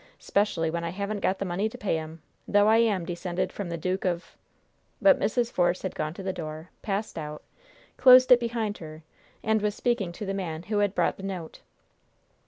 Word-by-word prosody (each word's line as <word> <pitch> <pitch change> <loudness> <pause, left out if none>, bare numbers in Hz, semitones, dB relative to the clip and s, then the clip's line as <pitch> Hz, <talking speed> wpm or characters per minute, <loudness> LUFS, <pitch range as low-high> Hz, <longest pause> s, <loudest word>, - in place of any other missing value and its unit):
'Specially 175 -6 0
when 170 0 -3
I 170 - -2
haven't 200 +3 -3
got 190 0 0
the 195 - -3
money 190 +4 -1
to - - -10
pay 190 -5 -1
'em, 160 0 -9 0.2
though 205 0 +4
I 220 +1 +6
am 210 -6 +2
descended 175 +1 -3
from 200 -4 -5
the 170 - -3
Duke 185 +3 -2
of 175 -1 -2 0.3
" - - -42
But 290 -2 +5
Mrs. 235 +2 0
Force 175 0 +1
had 190 - -3
gone 155 +1 -3
to 195 - -7
the 190 0 -2
door, 155 0 -7
passed 200 -3 -3
out, 150 0 -7 0.5
closed 255 0 +8
it 250 - +9
behind 230 -3 -2
her, 155 -1 -10 0.4
and 220 -1 +2
was 210 0 0
speaking 235 -7 0
to 210 - -6
the 195 - -2
man 170 -4 -4
who 210 +2 -1
had 205 -1 +1
brought - - +1
the - - -10
note. 185 -4 -6
190 Hz, 210 wpm, -27 LUFS, 170-210 Hz, 0.5 s, it